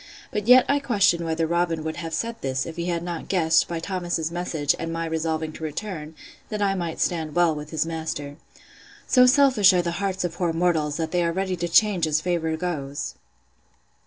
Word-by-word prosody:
But 210 0 -3
yet 250 +1 +8
I 285 - +2
question 200 -10 +2
whether 165 0 0
Robin 170 -1 0
would 160 0 -4
have 165 -1 -5
said 230 +6 -3
this, 130 0 -1
if 165 - -7
he 170 0 -3
had 170 -1 -1
not 175 -2 -5
guessed, 165 -3 +3
by 170 -1 -3
Thomas's 175 -2 -2
message, 165 -4 0
and 165 0 -3
my 165 0 -2
resolving 160 -1 -2
to 160 - -9
return, 155 -1 -5 0.3
that 210 - -3
I 200 -1 +2
might 170 -4 -4
stand 160 -3 -1
well 175 -2 +4
with 150 0 -7
his 160 0 -1
master. 160 -3 -5 0.7
So 250 -1 +5
selfish 250 -7 +5
are 180 -1 +2
the 170 - -1
hearts 195 -1 -1
of 175 -2 -2
poor 170 -1 -1
mortals, 160 -3 +1
that 160 -1 -3
they 175 -1 +1
are 170 - +1
ready 190 +1 -1
to 175 0 -3
change 190 -3 +3
as 155 0 +2
favour 160 -1 -1
goes! 145 -5 -4
170 Hz, 205 wpm, -24 LUFS, 160-185 Hz, 0.7 s, yet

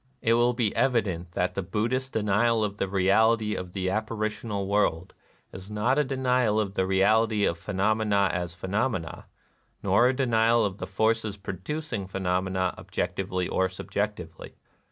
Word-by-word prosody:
It 115 - +3
will 120 +1 +3
be 115 -4 -1
evident 95 -9 0
that 90 0 0
the 100 - -2
Buddhist 115 +8 -2
denial 110 +2 +2
of 105 -1 -3
the 100 - -1
reality 105 +3 +3
of 90 -3 -6
the 95 -1 -1
apparitional 110 -1 -2
world 95 -3 0 0.4
is 95 +2 -9
not 110 +7 +1
a - - +4
denial 125 -5 +1
of 100 -3 -2
the 95 -2 0
reality 105 +2 +3
of 85 - +1
phenomena 100 +1 +1
as 90 -1 -3
phenomena, 95 0 -2 0.6
nor 120 - +4
a 130 - +1
denial 115 -3 +3
of 100 -1 -4
the - - -5
forces 110 +1 0
pro 100 0 -6
ducing 110 - -5
phenomena 95 -1 -1
objectively 90 0 -3
or 95 0 +1
subjectively. 95 -2 -5
105 Hz, 155 wpm, -27 LUFS, 95-115 Hz, 0.6 s, a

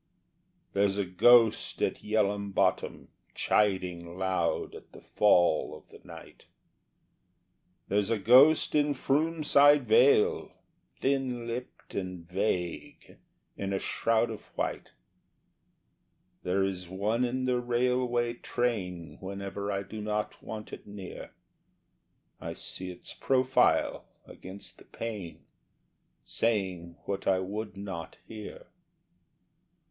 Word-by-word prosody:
There's 100 0 +2
a 100 - 0
ghost 115 +5 +4
at - - -1
Yell'ham 100 -2 0
Bottom - - 0 0.3
chiding 90 -4 0
loud 95 -3 -1
at - - -13
the - - -13
fall 90 -6 +3
of - - -21
the - - -15
night, - - -13 1.4
There's 100 +1 +1
a 115 - +1
ghost 130 +9 +6
in 145 -1 +2
Froom 155 +5 0
side 145 0 +6
Vale, 445 -1 +4 0.5
thin 130 -3 -1
lipped 120 +2 -7
and 90 -3 -5
vague, 90 -2 -3 0.4
in 100 0 -3
a - - +1
shroud 115 +3 0
of 110 - -8
white, - - -3 1.5
There 95 +2 0
is 90 -2 -3
one 105 +6 0
in 130 +1 -1
the 125 -1 +1
railway 120 -1 0
train 100 -9 -3
whenever 100 +1 -5
I 100 0 -2
do 105 +3 -8
not 105 0 -3
want 110 -1 -8
it - - -9
near, 100 -3 -8 1.1
I - - -5
see 95 0 -5
its 90 - -7
profile 130 0 +2 0.2
against 95 +2 -10
the - - -16
pane, 105 -7 -7 0.8
saying 95 -7 -1
what 100 -1 -4
I 95 - +4
would 100 +1 -5
not 95 -5 -7
hear. 110 -2 -9
105 Hz, 115 wpm, -29 LUFS, 95-120 Hz, 1.5 s, ghost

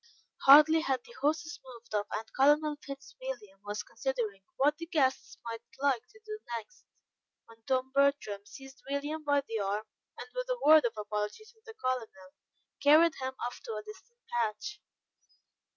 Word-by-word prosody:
Hardly 305 +3 +9
had 265 -4 0
the 480 - -14
horses 315 +3 0
moved 240 -3 -13
off, 205 0 0
and 215 +1 -3
Colonel 295 +2 +4
Fitzwilliam 265 -7 -8
was 205 +1 -4
considering 225 -4 -3 0.2
what 295 +2 +3
the 335 - -6
guests 280 -7 0
might 230 -1 -5 0.2
like 275 -4 +2
to 435 - -20
do 430 0 -6 0.2
next, 215 -2 -12 0.6
when 230 0 -18
Tom 260 0 0
Bertram 275 -8 +2
seized 270 +5 -13
William 290 +3 -2
by 285 -1 +3
the 225 -1 -2
arm, 205 +2 -1 0.3
and - - -7
with - - -3
a - - 0
word 310 -2 +8
of 235 - 0
apology 210 - -3
to 445 - -30
the 445 - -10
Colonel, 255 - -3 0.5
carried 310 +3 +6
him 260 0 -3
off 245 - -5
to 225 - -5
a 215 - -5
distant 215 - -13
patch. 235 - -2
270 Hz, 165 wpm, -31 LUFS, 225-300 Hz, 0.6 s, Hardly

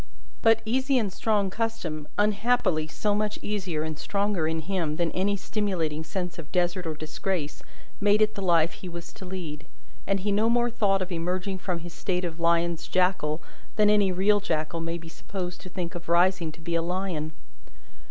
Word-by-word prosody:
But, 225 -1 +5
easy 260 +4 +2
and 210 -6 0
strong 205 -3 +1
custom, 185 -9 -2
unhappily 205 -6 +2
so 205 +6 0
much 210 0 0
easier 185 -7 -1
and 155 -1 -4
stronger 200 -5 0
in 160 0 -1
him 165 -3 -1
than 170 0 0
any 200 +2 +1
stimulating 185 -7 -1
sense 180 +1 -4
of 150 - -9
desert 180 0 +1
or 155 - -2
disgrace, 155 0 -3 0.4
made 205 0 +4
it 215 0 +3
the 200 - -5
life 170 -3 +4
he 185 - -8
was 170 0 -8
to 190 - -10
lead; 170 -5 -6 0.4
and 195 -1 +1
he 205 +2 0
no 215 +3 +3
more 240 0 +3
thought 195 -4 +2
of 185 - -9
emerging 180 +3 -1
from 180 -2 -2
his 170 0 -8
state 180 -1 -1
of 165 -1 -5
lion's 170 0 +2
jackal, 180 -4 +1 0.3
than 210 -1 +5
any 205 -2 +4
real 200 +3 +4
jackal 165 -3 -1
may 165 +1 -2
be 165 -1 -10
supposed 180 +1 -6
to 185 - -9
think 175 -2 -4
of 170 -1 -7
rising 175 -1 +3
to 165 - -14
be 170 +1 -3
a 165 - +3
lion. 175 -3 -2
180 Hz, 190 wpm, -27 LUFS, 165-205 Hz, 0.4 s, But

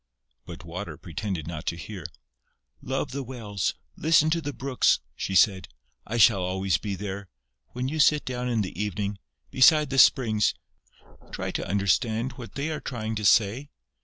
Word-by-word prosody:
But 90 +1 -9
Water 90 +5 -6
pretended 90 -1 -5
not 80 -1 -7
to - - 0
hear: 90 -1 -7 0.7
"Love 135 +1 -3
the 140 +2 -3
wells, 115 -6 -3 0.2
listen 155 0 +3
to 165 +1 +1
the 145 -1 -4
brooks," 135 -2 +1 0.2
she 95 - -3
said. 95 0 +4 0.4
"I 120 - -2
shall 110 -4 +5
always 95 -3 0
be 100 -2 -4
there. 100 0 -6 0.4
When 125 +1 -2
you 155 +3 -3
sit 150 0 +4
down 125 -1 -3
in 115 -3 +1
the 95 0 -5
evening, 105 -1 -3 0.3
beside 150 +2 +5
the 135 - +2
springs, 110 -7 +4 0.8
try - - -4
to - - -4
understand 110 +5 +1
what 125 -2 -11
they 145 +3 -2
are 155 - -4
trying 110 -4 -4
to 105 -1 -3
say...." 115 +7 +3
110 Hz, 165 wpm, -26 LUFS, 95-130 Hz, 0.8 s, shall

